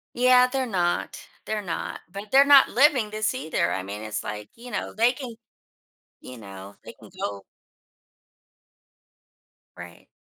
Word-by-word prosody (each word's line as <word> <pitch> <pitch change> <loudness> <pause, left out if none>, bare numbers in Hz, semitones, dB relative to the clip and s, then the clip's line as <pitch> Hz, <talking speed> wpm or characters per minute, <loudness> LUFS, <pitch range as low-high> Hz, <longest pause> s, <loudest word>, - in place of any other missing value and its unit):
Yeah, 250 0 +5
they're 260 0 -2
not 180 -6 -1 0.3
they're 215 -1 -2
not, 175 -5 -5
but 200 +2 -9
they're 275 +1 +7
not 280 -1 +7
living 255 -5 +3
this 215 +2 -1
either, 155 - -1
I 95 - -2
mean, 100 +3 -7
it's 110 0 -4
like, 105 0 -7
you 245 +2 -11
know, - - -4
they 235 +3 +3
can 250 -3 -8 0.9
you 125 -1 -11
know 100 -1 -11
they - - -10
can - - -17
go 100 -1 -4 2.3
Right. - - -12
215 Hz, 145 wpm, -25 LUFS, -, 2.3 s, they're